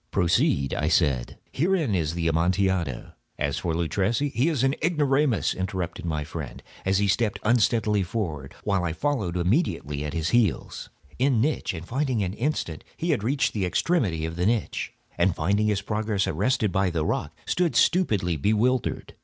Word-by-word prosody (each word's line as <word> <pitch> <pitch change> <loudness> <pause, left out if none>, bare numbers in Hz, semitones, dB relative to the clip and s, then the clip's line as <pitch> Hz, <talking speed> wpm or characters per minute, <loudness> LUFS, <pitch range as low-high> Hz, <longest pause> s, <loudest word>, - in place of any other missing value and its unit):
"Proceed," 85 -6 +2
I - - -1
said; 65 -4 +1
"herein 165 - +1
is 80 -3 0
the 85 -1 -1
Amontillado. 85 -3 0 0.3
As 70 -1 -1
for 85 -3 -2
Luchesi—" 100 - 0
"He 125 +8 +2
is 145 -6 0
an 135 0 +3
ignoramus," 145 - +2
interrupted 95 -2 -4
my 80 -3 -1
friend, - - -7 0.2
as 95 0 +3
he 100 0 +2
stepped 105 +1 +1
unsteadily 110 -2 +2
forward, 85 -8 -4
while 100 -3 +1
I 85 -2 -1
followed 105 - -1
immediately 85 - 0
at 75 -1 -4
his 80 0 0
heels. 115 -3 0 0.3
In 130 -2 +3
an 130 - -2 0.3
instant 115 - -2
he 170 +1 0
had 125 -9 0
reached 140 +5 +1
the 105 - -1
extremity 95 - 0
of 80 +1 -5
the 90 +2 +1
niche, 115 -1 -1 0.3
and 85 0 +3
finding 100 +6 +1
his 100 -2 0
progress 105 -2 -1
arrested 105 +4 +1
by 95 +1 +1
the 80 -3 -1
rock, - - -2
stood 175 -2 0
stupidly 105 - +2
bewildered. 110 - 0
100 Hz, 160 wpm, -25 LUFS, 85-125 Hz, 0.3 s, an